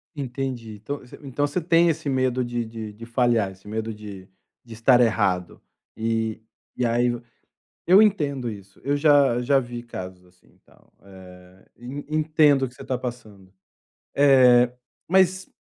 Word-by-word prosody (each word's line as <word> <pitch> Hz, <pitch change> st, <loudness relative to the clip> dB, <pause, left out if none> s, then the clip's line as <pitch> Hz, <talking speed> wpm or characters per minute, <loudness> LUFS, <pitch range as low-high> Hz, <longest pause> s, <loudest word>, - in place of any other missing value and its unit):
Entendi. 130 Hz, -5 st, -5 dB
Então 115 Hz, +8 st, -6 dB
você 125 Hz, -, -14 dB
então 145 Hz, +1 st, -1 dB
você 160 Hz, +5 st, -3 dB
tem 170 Hz, +1 st, +3 dB
esse 150 Hz, -2 st, -2 dB
medo 130 Hz, -1 st, 0 dB
de 120 Hz, -1 st, -3 dB
de 110 Hz, -1 st, -8 dB
de 115 Hz, +2 st, -11 dB
falhar, 115 Hz, -4 st, +1 dB
esse 95 Hz, +2 st, -17 dB
medo 110 Hz, +1 st, -4 dB
de 100 Hz, -3 st, -10 dB, 0.4 s
de 115 Hz, -, -11 dB
estar 120 Hz, +3 st, +4 dB
errado 100 Hz, -6 st, 0 dB, 0.3 s
e 110 Hz, 0 st, -2 dB, 0.3 s
e 125 Hz, -, -1 dB
aí 120 Hz, +1 st, +2 dB
e 120 Hz, 0 st, -6 dB, 0.7 s
eu 185 Hz, +4 st, +7 dB
entendo 145 Hz, -, 0 dB
isso. 100 Hz, -2 st, -12 dB
Eu 140 Hz, +2 st, 0 dB
já 145 Hz, -4 st, +4 dB
já 135 Hz, +2 st, +3 dB
vi 120 Hz, -1 st, -7 dB
casos, 95 Hz, -6 st, -9 dB
assim, 90 Hz, 0 st, -26 dB
e -, -, -30 dB
tal, -, -, -27 dB
eh, 95 Hz, 0 st, -16 dB
e 120 Hz, -, -17 dB, 0.2 s
e 155 Hz, -, -2 dB
entendo 155 Hz, -3 st, +3 dB
o -, -, -3 dB
que 125 Hz, -, -19 dB
você -, -, -11 dB
tá 130 Hz, -, -2 dB
passando. 105 Hz, -7 st, -9 dB, 0.6 s
Eh, 125 Hz, -3 st, +5 dB, 0.4 s
mas 190 Hz, +1 st, +2 dB
120 Hz, 170 wpm, -23 LUFS, 110-140 Hz, 0.7 s, eu